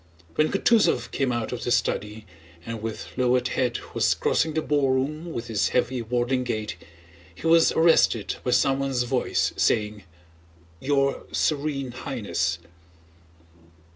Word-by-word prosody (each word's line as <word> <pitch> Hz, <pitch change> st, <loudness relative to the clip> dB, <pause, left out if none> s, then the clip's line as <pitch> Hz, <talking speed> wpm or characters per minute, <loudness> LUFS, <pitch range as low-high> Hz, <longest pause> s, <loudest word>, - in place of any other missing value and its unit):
When 155 Hz, -, +2 dB
Kutúzov 220 Hz, +2 st, +2 dB
came 135 Hz, -2 st, 0 dB
out 120 Hz, -2 st, -2 dB
of 125 Hz, -1 st, -5 dB
the -, -, -2 dB
study 105 Hz, -2 st, -1 dB, 0.4 s
and 115 Hz, -1 st, -5 dB
with 110 Hz, 0 st, -5 dB
lowered 125 Hz, 0 st, +2 dB
head 125 Hz, -2 st, 0 dB, 0.2 s
was -, -, +2 dB
crossing 160 Hz, -1 st, 0 dB
the 160 Hz, -, 0 dB
ballroom 145 Hz, +3 st, 0 dB
with 120 Hz, -5 st, -5 dB
his 110 Hz, -3 st, 0 dB
heavy 125 Hz, 0 st, 0 dB
waddling 125 Hz, +2 st, 0 dB
gait, 110 Hz, -4 st, -3 dB, 0.6 s
he -, -, -11 dB
was 165 Hz, 0 st, +5 dB
arrested 160 Hz, -9 st, +3 dB
by -, -, -2 dB
someone's 135 Hz, 0 st, +2 dB
voice 120 Hz, -, 0 dB
saying: 105 Hz, -2 st, 0 dB, 0.7 s
"Your 140 Hz, +2 st, 0 dB
Serene 140 Hz, -3 st, -1 dB
Highness!" 100 Hz, -9 st, -2 dB
125 Hz, 130 wpm, -25 LUFS, 115-140 Hz, 0.7 s, was